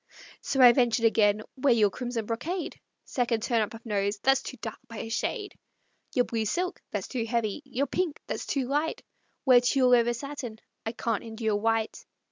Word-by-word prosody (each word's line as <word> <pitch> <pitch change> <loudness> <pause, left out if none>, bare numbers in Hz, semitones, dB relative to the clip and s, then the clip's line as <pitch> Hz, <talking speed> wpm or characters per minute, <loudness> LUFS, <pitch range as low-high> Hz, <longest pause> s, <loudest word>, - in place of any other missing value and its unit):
So 270 - 0
I 245 - +11
ventured 240 -2 +2
again: 215 -1 +3
"Wear 260 -2 +4
your 210 -3 +4
crimson 240 -2 -3
brocade;" 315 - -3 0.3
(Second 235 -3 0
turn 235 -2 +2
up 215 +1 -2
of 225 - -13
nose) 205 -1 0
"That's 270 0 +4
too 260 - -7
dark - - -6
by 230 -2 -9
a 225 - -5
shade." 405 - -2 0.6
"Your 245 -2 +4
blue 225 -2 -2
silk" 360 - -1
"That's 205 -3 -3
too 245 -3 -2
heavy." 225 +1 -1
"Your 275 +1 -1
pink" 325 +2 -2
"That's - - -4
too 270 -3 -1
light." 295 +4 -1 0.4
"Wear 250 -2 +7
tulle 250 0 +3
over 240 0 +4
satin" 260 -4 -6 0.3
"I 225 - -2
can't 230 -2 -2
endure 220 -1 -2
white." 225 +1 0
235 Hz, 185 wpm, -28 LUFS, 220-265 Hz, 0.6 s, I